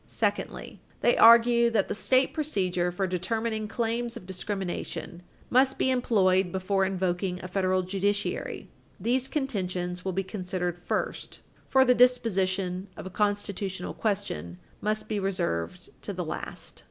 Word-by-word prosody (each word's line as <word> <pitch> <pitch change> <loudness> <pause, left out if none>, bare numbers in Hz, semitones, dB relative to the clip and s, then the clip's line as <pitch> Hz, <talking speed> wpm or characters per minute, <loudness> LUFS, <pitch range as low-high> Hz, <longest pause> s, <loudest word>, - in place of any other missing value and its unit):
Secondly, - - -3 0.2
they 240 - +4
argue 235 +1 +7
that 220 -4 +1
the - - -2
state 255 +5 +2
procedure 185 - 0
for 190 +2 -1
determining 215 +4 -2
claims 235 +1 -2
of - - -11
discrimination 190 -2 -4 0.3
must 260 +2 +4
be 260 - +2
employed 190 -7 +2
before 190 +1 +1
invoking 185 -1 -1
the 185 0 -7
federal 185 0 +1
judiciary. 200 +2 -2 0.3
These 255 +3 +1
contentions 180 - -2
will 190 - -1
be 195 +2 0
considered 180 -2 -3
first, - - -3 0.3
for 265 0 +5
the 250 - +5
disposition 195 -7 +2
of - - -7
a 190 - -6
constitutional 200 -2 -2
question 185 - -2 0.2
must 215 +1 -1
be 215 -2 -1
reserved 85 - -2
to - - -4
the - - -3
last. - - -6
195 Hz, 140 wpm, -27 LUFS, 185-230 Hz, 0.3 s, argue